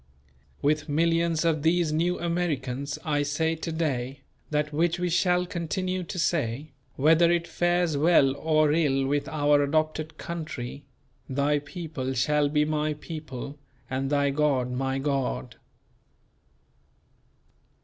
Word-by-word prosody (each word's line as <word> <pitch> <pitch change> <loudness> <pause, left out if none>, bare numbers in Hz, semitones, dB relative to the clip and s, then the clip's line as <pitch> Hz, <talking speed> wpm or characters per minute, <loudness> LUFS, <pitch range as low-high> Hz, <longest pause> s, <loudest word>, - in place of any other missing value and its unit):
With 150 +2 +1
millions 165 +1 +2
of 160 -3 +2
these 165 0 +2
New 175 +3 +1
Americans 145 -6 -2
I 145 -2 +1
say 155 +3 0
to 165 - -4
day 135 -5 -2 0.3
that 150 0 -1
which 170 +3 +1
we 180 0 -1
shall 180 +1 +2
continue 185 +1 -2
to 180 +2 -6
say, 150 -4 -1 0.2
whether 165 +4 +5
it 170 -1 +1
fares 175 -3 +1
well 140 -3 +4
or 155 0 +2
ill 140 -4 +2
with 145 +1 0
our 145 -1 +3
adopted 155 +2 -1
country: 145 -5 -6 0.4
"Thy 145 +2 +1
people 145 -4 -5
shall 145 +3 +2
be 150 0 +2
my 155 0 -1
people, 150 -3 -7 0.3
and 135 +1 -1
thy 145 -1 +2
God 135 -4 +1
my 135 +1 -1
God." 135 - -2
150 Hz, 130 wpm, -27 LUFS, 140-165 Hz, 0.4 s, whether